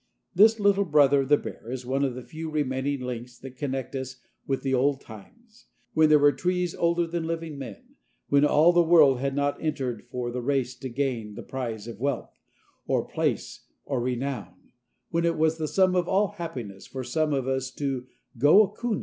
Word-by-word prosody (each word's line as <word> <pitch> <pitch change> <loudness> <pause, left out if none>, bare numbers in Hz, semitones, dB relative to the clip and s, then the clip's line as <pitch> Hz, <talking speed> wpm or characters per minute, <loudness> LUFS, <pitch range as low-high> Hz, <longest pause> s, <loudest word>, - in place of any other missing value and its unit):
This 215 +4 +5
little 200 -1 +3
brother 145 -3 +4
of 135 - -4
the 145 - +6
bear 115 - -9
is 125 0 -5
one 135 +2 0
of 130 -3 -1
the 125 - -7
few 160 +6 -7
remaining 140 -2 -1
links 125 -1 -6
that 130 +1 -11
connect 135 -2 -4
us 130 -1 -5 0.3
with 135 -1 -1
the 135 -1 0
old 135 +2 +2
times, 220 - -15 0.3
when 155 -1 +4
there 155 - +7
were 145 0 +5
trees 180 +4 -1
older 170 0 +1
than 165 -1 -3
living 165 -2 -4
men, 120 -7 -10 0.3
when 140 0 +4
all 150 +4 +5
the 175 - +5
world 160 -6 +5
had 135 +1 -2
not 145 0 -1
entered 130 -7 -3
for 125 -1 -3
the 125 +1 -3
race 130 -1 0
to 130 - -5
gain 120 -5 -2
the - - -7
prize 115 -5 -5
of 115 -3 -8
wealth, 140 -1 -3 0.5
or - - +1
place, - - -3 0.2
or 135 -4 -1
renown; 125 -7 -4 0.4
when 170 0 +1
it 170 0 +1
was 160 +1 +1
the 155 - -1
sum 185 +2 +3
of 175 -1 +1
all 195 +1 +2
happiness 130 - -7
for 130 -1 -6
some 155 +5 0
of 135 -2 -1
us 130 -1 -1
to 130 -2 -4 0.3
"go 150 - +7
a 200 - -3
coonin'." 225 0 -2
140 Hz, 200 wpm, -26 LUFS, 125-165 Hz, 0.5 s, there